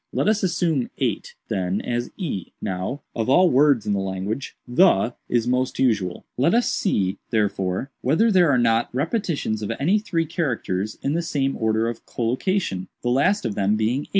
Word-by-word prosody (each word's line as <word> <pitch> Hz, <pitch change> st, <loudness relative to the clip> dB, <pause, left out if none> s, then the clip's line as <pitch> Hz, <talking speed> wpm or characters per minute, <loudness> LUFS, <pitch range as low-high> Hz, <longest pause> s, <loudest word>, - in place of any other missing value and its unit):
"Let -, -, 0 dB
us 215 Hz, 0 st, +2 dB
assume 170 Hz, -7 st, 0 dB
8, -, -, -2 dB
then, 95 Hz, +1 st, -1 dB
as 120 Hz, 0 st, -2 dB
e. 150 Hz, -, -4 dB
Now, 95 Hz, +10 st, -4 dB
of 115 Hz, +1 st, -1 dB
all 180 Hz, +6 st, +5 dB
words 135 Hz, -3 st, +4 dB
in 105 Hz, -, 0 dB
the 100 Hz, -, 0 dB
language, 95 Hz, +6 st, -4 dB
'the' 125 Hz, -, +4 dB, 0.2 s
is 120 Hz, -1 st, +1 dB
most 125 Hz, +1 st, 0 dB
usual; 105 Hz, -8 st, 0 dB
let 160 Hz, -, +3 dB
us 240 Hz, -, +3 dB
see, 95 Hz, -, 0 dB
therefore, 100 Hz, +2 st, -1 dB
whether 180 Hz, -, +3 dB
there 180 Hz, -5 st, +5 dB
are 135 Hz, -, +4 dB
not 115 Hz, -1 st, +2 dB
repetitions 155 Hz, -, -1 dB
of 105 Hz, -, -3 dB
any 180 Hz, +10 st, +3 dB
three 175 Hz, -6 st, -1 dB
characters, 115 Hz, -, -2 dB
in 140 Hz, -, 0 dB
the 170 Hz, -, 0 dB
same 140 Hz, -5 st, -1 dB
order 110 Hz, 0 st, +1 dB
of 115 Hz, -, -5 dB
collocation, 120 Hz, -, -1 dB, 0.2 s
the 120 Hz, -, +1 dB
last 165 Hz, +8 st, +2 dB
of 110 Hz, -, -1 dB
them 100 Hz, +1 st, +1 dB
being 110 Hz, +5 st, 0 dB
8. -, -, -22 dB
125 Hz, 180 wpm, -23 LUFS, 105-165 Hz, 0.2 s, all